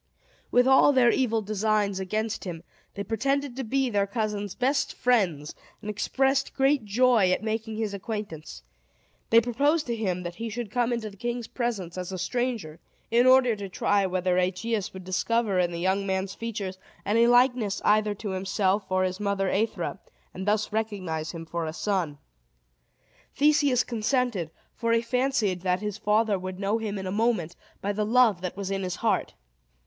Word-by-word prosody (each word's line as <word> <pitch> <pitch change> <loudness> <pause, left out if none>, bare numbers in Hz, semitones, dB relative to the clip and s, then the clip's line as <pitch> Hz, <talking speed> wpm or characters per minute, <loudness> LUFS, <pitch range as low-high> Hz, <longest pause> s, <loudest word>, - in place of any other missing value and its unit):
With 245 +1 +4
all 265 +2 +6
their 245 -3 +5
evil 230 -4 +1
designs 210 -1 0
against 215 +4 -2
him, 170 -3 -6 0.3
they 200 - -3
pretended 275 +5 -1
to 265 - -3
be 265 +3 0
their 200 -4 +1
cousin's 205 -2 -3
best 275 +3 0
friends, 185 -12 +1 0.3
and 210 0 -5
expressed 270 +5 0
great 270 -3 +2
joy 225 -2 +3
at 185 - 0
making 220 0 -3
his 220 -2 -2
acquaintance. 195 - -6 0.7
They 230 - +7
proposed 285 +7 +1
to 235 - -2
him 185 -5 -2
that 175 0 -6
he 230 +1 -4
should 225 -1 -5
come 245 +1 +1
into 225 -3 -3
the 200 - -16
king's 240 +2 -3
presence 200 -8 -3
as 180 +1 -5
a 190 - -4
stranger, 230 -7 -2 0.3
in 240 +2 +4
order 255 -3 +5
to 200 -2 -7
try 200 +1 +1
whether 185 0 +1
Aegeus 190 +3 -1
would 190 0 -9
discover 200 +2 0
in 175 -1 +1
the 170 - -4
young 190 +3 0
man's 190 0 -1
features 205 -5 -5 0.3
any 230 +3 +4
likeness 245 -4 +3
either 210 0 +3
to 205 0 -5
himself 190 +1 0
or 185 0 +2
his 185 +1 -2
mother 200 -2 0
Aethra, 220 +3 -1 0.3
and 190 +2 -6
thus 210 0 +1
recognize 185 -8 -2
him 165 -2 -7
for 165 0 -3
a 155 - -4
son. 180 -6 -1 1.2
Theseus 285 -3 +3
consented; 230 - -1 0.2
for 230 0 0
he 230 0 +2
fancied 245 -7 0
that 180 0 0
his 210 0 -4
father 210 -1 +2
would 185 0 -6
know 205 +3 0
him 210 -2 -3
in 190 - -5
a 185 - -3
moment, 210 -6 0 0.3
by 205 +1 0
the 210 +1 -1
love 220 -4 +3
that 185 0 -5
was 195 -1 -4
in 195 0 -1
his 180 -2 -3
heart. - - +1
210 Hz, 180 wpm, -26 LUFS, 190-235 Hz, 1.2 s, They